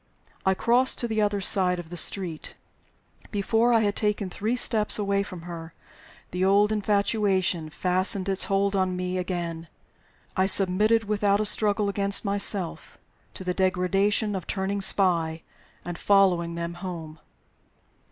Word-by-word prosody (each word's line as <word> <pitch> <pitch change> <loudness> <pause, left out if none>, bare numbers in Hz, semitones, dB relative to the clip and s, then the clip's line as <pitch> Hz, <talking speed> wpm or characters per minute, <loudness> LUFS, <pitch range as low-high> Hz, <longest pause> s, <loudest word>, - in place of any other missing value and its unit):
I 190 - +3
crossed 245 +6 +2
to 240 - -3
the 220 -1 -1
other 205 -1 0
side 185 -1 +2
of 175 -1 -9
the - - -6
street. 175 -2 -2 0.7
Before 225 +3 0
I 230 -1 +3
had 205 -1 -1
taken 210 -3 -2
three 220 +6 -2
steps 220 -4 +4
away 200 -1 0
from 185 -4 -8
her, 165 -1 -9 0.6
the 180 +1 -2
old 200 +2 +3
infatuation 200 -5 0
fastened 185 +4 0
its 195 -1 +4
hold 200 0 0
on 185 -1 0
me 180 0 -3
again. 170 -2 -5 0.7
I 190 0 +1
submitted, 205 +4 +2
without 205 -1 0
a 215 - -1
struggle 210 0 +2
against 200 +1 +3
myself, 200 -3 0 0.4
to - - -7
the 180 -1 -2
degradation 195 +3 0
of 185 - -6
turning 195 +1 -3
spy 170 -5 +2 0.4
and 175 -1 -6
following 180 -4 +2
them 170 0 -5
home. 160 -4 -7
195 Hz, 145 wpm, -25 LUFS, 180-205 Hz, 0.7 s, steps